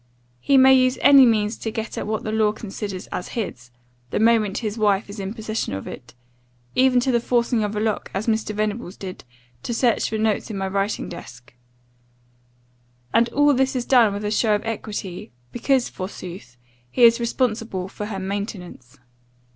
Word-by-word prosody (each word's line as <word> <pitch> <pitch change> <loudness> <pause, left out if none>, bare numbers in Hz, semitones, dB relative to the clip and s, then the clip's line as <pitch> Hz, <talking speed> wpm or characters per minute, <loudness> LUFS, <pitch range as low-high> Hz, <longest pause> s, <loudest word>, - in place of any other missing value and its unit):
He 275 - +3
may 265 0 +7
use 255 0 +3
any 275 -2 +8
means 215 -1 +1
to 225 - -4
get 220 0 -5
at - - -4
what 220 0 -2
the 215 - -3
law 215 -1 +2
considers 200 -3 -6
as 180 - -5
his, 125 - -4 0.4
the - - -1
moment 220 -3 +3
his 215 -3 -3
wife 205 -2 +1
is 205 - -8
in 195 +2 -5
possession 220 - -3
of 95 - -6
it, 120 - -10 0.6
even 255 -1 +4
to 260 - +1
the 240 - +3
forcing 235 -1 +1
of 210 0 -3
a - - -1
lock, 215 -1 -1
as 195 +3 -3
Mr. 220 -2 -1
Venables 210 -2 -3
did, 190 -1 -8 0.4
to 235 - -3
search 235 -2 +2
for 220 - -2
notes 215 0 0
in 210 - -4
my 195 0 -2
writing 200 +2 -1
desk 125 -9 -11 1.6
and 230 +1 +4
all 290 +3 +3
this 265 0 +1
is 245 -1 -1
done 240 -5 +5
with 205 +1 -4
a 210 - -1
show 215 0 +2
of 205 - -4
equity, 205 -7 -5 0.2
because, 260 +1 +1
forsooth, 180 - -8 0.3
he 245 - +1
is 230 0 +7
responsible 225 -5 -1
for 210 +2 -6
her 205 -2 -5
maintenance. 190 - -6
215 Hz, 185 wpm, -22 LUFS, 195-235 Hz, 1.6 s, any